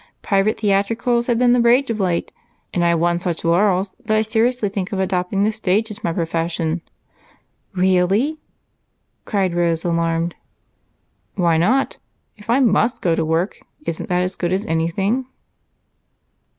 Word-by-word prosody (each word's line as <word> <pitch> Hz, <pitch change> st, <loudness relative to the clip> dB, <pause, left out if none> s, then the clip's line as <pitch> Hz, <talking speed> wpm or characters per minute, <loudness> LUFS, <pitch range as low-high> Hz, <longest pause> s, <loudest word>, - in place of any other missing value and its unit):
Private 195 Hz, +2 st, +1 dB
theatricals 225 Hz, +4 st, +1 dB
have 240 Hz, -2 st, +2 dB
been 245 Hz, 0 st, +4 dB
the 245 Hz, -, +3 dB
rage 240 Hz, +2 st, +3 dB
of 220 Hz, -, -3 dB
late, 180 Hz, -3 st, -1 dB, 0.4 s
and 175 Hz, -, +1 dB
I 170 Hz, -, +3 dB
have 170 Hz, -1 st, +2 dB
won 170 Hz, +1 st, +1 dB
such 175 Hz, -2 st, -3 dB
laurels 185 Hz, +2 st, +2 dB
that 215 Hz, 0 st, +1 dB
I 215 Hz, -, +3 dB
seriously 225 Hz, +1 st, +1 dB
think 195 Hz, 0 st, -4 dB
of 195 Hz, -, -2 dB
adopting 190 Hz, +1 st, 0 dB
the 215 Hz, -, +2 dB
stage 215 Hz, +1 st, 0 dB
as 210 Hz, -, -8 dB
my 170 Hz, -, 0 dB
profession." 165 Hz, 0 st, -2 dB, 0.9 s
"Really!" 190 Hz, -, +2 dB, 0.9 s
cried 195 Hz, -4 st, 0 dB
Rose, 170 Hz, -1 st, 0 dB
alarmed. 170 Hz, 0 st, 0 dB, 1.0 s
"Why 170 Hz, -4 st, +2 dB
not? 240 Hz, +12 st, +1 dB, 0.4 s
If 210 Hz, +1 st, -17 dB
I 240 Hz, +3 st, +4 dB
must 230 Hz, 0 st, +2 dB
go 170 Hz, -, +2 dB
to 165 Hz, -, 0 dB
work, 165 Hz, +5 st, -1 dB, 0.3 s
isn't 165 Hz, -, -4 dB
that 180 Hz, 0 st, +1 dB
as 185 Hz, +1 st, -3 dB
good 175 Hz, -1 st, -2 dB
as 195 Hz, +3 st, -1 dB
anything?" 195 Hz, +9 st, -1 dB
190 Hz, 155 wpm, -20 LUFS, 170-220 Hz, 1.0 s, been